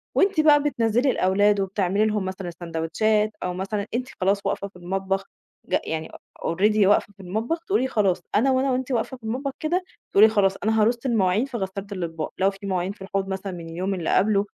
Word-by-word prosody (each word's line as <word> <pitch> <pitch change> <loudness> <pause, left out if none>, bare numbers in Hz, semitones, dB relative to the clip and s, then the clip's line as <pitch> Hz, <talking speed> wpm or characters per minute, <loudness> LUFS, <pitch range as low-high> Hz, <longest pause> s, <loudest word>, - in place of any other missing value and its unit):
وأنتِ 390 -3 +3
بقى 295 -2 +5
بتنزّلي 245 -2 +2
الأولاد 205 +1 +3
وبتعملي 195 +1 +1
لهم 210 -2 0
مثلًا 185 0 -5
الساندوتشات 175 +6 0
أو 180 - -2
مثلًا 195 +3 -3
أنتِ 250 +2 -1
خلاص 195 +2 +3
واقفة 200 - -1
في 200 - -21
المطبخ 190 +2 -2 0.4
ج - - +1
يعني 160 0 -4
أ - - -14 0.4
already 210 +4 +3
واقفة 205 0 +3
في 200 - -41
المطبخ 220 - -2
تقولي 320 -10 +2
خلاص، 195 -7 +1
أنا 265 +6 +4
وأنا 260 +1 +2
وأنتِ 260 +1 -2
واقفة 250 +2 -1
في 245 - -34
المطبخ 255 +5 -2
كده، 350 +4 0 0.3
تقولي 210 +2 +7
خلاص 200 -3 +2
أنا 220 +1 +2
هارص 235 +3 +3
المواعين 215 -2 +2
في 265 -3 -5
غسّالة 195 0 -4
الأطباق، 165 -5 -4
لو 190 +1 +3
في 195 +1 -11
مواعين 185 -1 -1
في 205 - -14
الحوض 195 0 -2
مثلًا 195 0 -4
من 170 -2 -8
اليوم 185 +4 -2
اللي 175 -4 -3
قبله 200 +1 +3
200 Hz, 200 wpm, -24 LUFS, 190-230 Hz, 0.4 s, تقولي